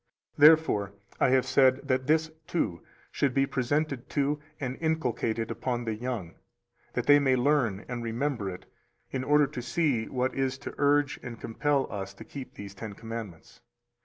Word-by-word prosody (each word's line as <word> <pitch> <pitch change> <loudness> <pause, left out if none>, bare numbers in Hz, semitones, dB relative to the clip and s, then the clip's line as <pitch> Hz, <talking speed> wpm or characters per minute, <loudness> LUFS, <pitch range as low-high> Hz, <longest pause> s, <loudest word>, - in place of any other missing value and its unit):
Therefore 145 -10 +5 0.3
I - - +4
have 130 0 +3
said 130 0 +3
that 130 0 0
this, 160 +1 +2 0.2
too, 90 - -1 0.3
should 135 -3 0
be 135 0 +4
presented 135 0 -1
to 145 +1 0 0.2
and 130 -2 -3
inculcated 125 -8 -1
upon 120 -2 -2
the 110 - -1
young, 110 -6 -4 0.6
that - - -1
they 145 0 +7
may 135 -2 +3
learn 125 -6 +1
and 120 -1 -4
remember 115 -2 -2
it, 90 0 -8 0.5
in 130 - -2
order 150 +1 +4
to 135 -3 -6
see 125 -3 0
what 130 0 -1
is 135 -1 -1
to - - -7
urge 145 -2 +3
and 120 -3 -8
compel 140 +4 0
us 100 -2 -5
to - - -10
keep 135 -3 -9
these 100 -1 -8
Ten 105 +1 -7
Commandments. 115 -5 -8
130 Hz, 165 wpm, -28 LUFS, 115-145 Hz, 0.6 s, they